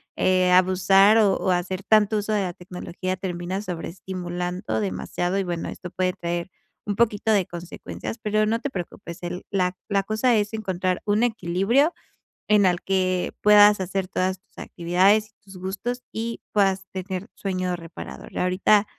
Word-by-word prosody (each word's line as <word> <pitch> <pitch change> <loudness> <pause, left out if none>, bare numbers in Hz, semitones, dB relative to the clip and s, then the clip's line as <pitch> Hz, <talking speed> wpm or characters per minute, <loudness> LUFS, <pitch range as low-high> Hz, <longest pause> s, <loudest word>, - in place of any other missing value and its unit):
eh, 185 -1 +3
abusar 190 +3 +5
o 200 -3 +4
o 185 - 0
hacer 185 +2 -1
tanto 215 0 +4
uso 210 +1 -1
de 205 - +2
la 180 -2 -2
tecnología 180 +1 -5
termina 185 +1 -3
sobreestimulando 180 - -4
demasiado 110 - -2
y 195 - +1
bueno 175 -2 -3
esto 180 -1 -8
puede 185 -1 0
traer 170 +1 -3 0.3
un 205 -1 -2
poquito 220 -1 +2
de 195 -4 +3
consecuencias, 175 +6 -7
pero 215 -1 +1
no 230 +1 +1
te 285 +1 -4
preocupes, 170 -1 -7
el 175 +1 -5
la 185 -2 0
la 200 -2 +2
cosa 220 +4 +2
es 210 0 +1
encontrar 185 -4 -2
un 210 +2 +2
equilibrio, 225 - +2 0.6
en 210 -2 +5
el 175 -1 +2
que 185 -1 0
puedas 210 -1 +7
hacer 190 0 -2
todas 185 +1 -1
tus - - -38
actividades 190 +5 +2
y 215 - -40
tus 190 -2 -13
gustos 205 +7 -4
y 230 +1 -4
puedas 195 -2 +2
tener 190 +2 -5
sueño 185 -2 -2
reparador. 165 0 -9
Ahorita 195 +3 +3
190 Hz, 160 wpm, -24 LUFS, 180-210 Hz, 0.6 s, puedas